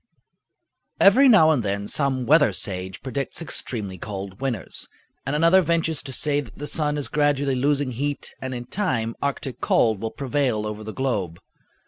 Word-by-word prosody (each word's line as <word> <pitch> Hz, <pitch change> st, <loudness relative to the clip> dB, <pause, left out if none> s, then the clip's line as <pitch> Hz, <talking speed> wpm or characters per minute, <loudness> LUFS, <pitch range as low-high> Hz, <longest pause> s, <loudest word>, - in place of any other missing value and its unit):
Every 255 Hz, +8 st, +7 dB
now 160 Hz, -9 st, +7 dB
and 145 Hz, -6 st, +2 dB
then 100 Hz, -1 st, -2 dB
some 135 Hz, -2 st, 0 dB
weather 145 Hz, -5 st, +5 dB
sage 95 Hz, 0 st, -5 dB
predicts 135 Hz, +1 st, -3 dB
extremely 105 Hz, -, -4 dB
cold 95 Hz, 0 st, -7 dB
winters, 125 Hz, -7 st, -4 dB, 0.4 s
and 140 Hz, -, 0 dB
another 170 Hz, +5 st, +5 dB
ventures 165 Hz, -3 st, +1 dB
to 135 Hz, -, -8 dB
say 145 Hz, +2 st, +1 dB
that -, -, -13 dB
the 145 Hz, -, -5 dB
sun 150 Hz, -1 st, -1 dB
is 145 Hz, -, -3 dB
gradually 145 Hz, -2 st, +1 dB
losing 140 Hz, +1 st, +1 dB
heat 145 Hz, +4 st, -3 dB
and 130 Hz, -1 st, -4 dB
in 120 Hz, 0 st, -6 dB
time 120 Hz, -, -1 dB
Arctic 140 Hz, -2 st, -3 dB
cold 110 Hz, -4 st, +2 dB
will 110 Hz, -, -2 dB
prevail 130 Hz, -4 st, -1 dB
over 105 Hz, 0 st, -5 dB
the 110 Hz, -, -6 dB
globe. 105 Hz, -10 st, -2 dB
135 Hz, 165 wpm, -23 LUFS, 110-150 Hz, 0.4 s, Every